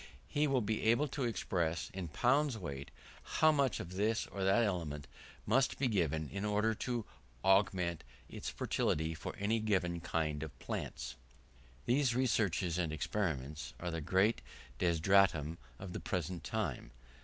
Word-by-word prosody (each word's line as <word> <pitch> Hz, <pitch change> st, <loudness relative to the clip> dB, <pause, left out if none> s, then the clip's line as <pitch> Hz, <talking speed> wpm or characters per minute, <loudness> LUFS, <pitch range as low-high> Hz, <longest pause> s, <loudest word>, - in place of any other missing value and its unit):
He 150 Hz, +1 st, +1 dB
will 135 Hz, -3 st, +2 dB
be 110 Hz, 0 st, -1 dB
able 120 Hz, +7 st, +4 dB
to 135 Hz, -1 st, -2 dB
express, 85 Hz, -6 st, -1 dB
in 95 Hz, -2 st, -4 dB
pounds 125 Hz, -, +2 dB
weight, 70 Hz, -8 st, -6 dB, 0.3 s
how 155 Hz, 0 st, +4 dB
much 140 Hz, -6 st, +2 dB
of 85 Hz, -, -6 dB
this 110 Hz, +4 st, +1 dB
or 100 Hz, -, -5 dB
that 95 Hz, +5 st, +4 dB
element 80 Hz, -8 st, -2 dB
he -, -, -19 dB
must 130 Hz, +5 st, +3 dB
give 100 Hz, -, +2 dB
in 80 Hz, +6 st, -3 dB
order 105 Hz, +2 st, +2 dB
to 120 Hz, 0 st, -2 dB, 0.4 s
augment 95 Hz, -4 st, +3 dB, 0.2 s
its -, -, -5 dB
fertility 80 Hz, +1 st, 0 dB
for 80 Hz, -, -6 dB
any 105 Hz, +3 st, +1 dB
given 95 Hz, -5 st, +1 dB
kind 75 Hz, -3 st, -1 dB
of 80 Hz, -3 st, -7 dB
plants. -, -, -5 dB, 0.7 s
These 125 Hz, -1 st, +3 dB
researches 100 Hz, -8 st, +1 dB
and 85 Hz, -3 st, 0 dB
experiments 75 Hz, -, -2 dB
are 90 Hz, 0 st, -3 dB
the 80 Hz, -1 st, -3 dB
great 95 Hz, +8 st, +2 dB, 0.4 s
desideratum 85 Hz, -2 st, +3 dB, 0.2 s
of 90 Hz, +4 st, -7 dB
the -, -, -3 dB
present 90 Hz, 0 st, -3 dB
time. -, -, -2 dB
95 Hz, 150 wpm, -35 LUFS, 80-110 Hz, 0.7 s, able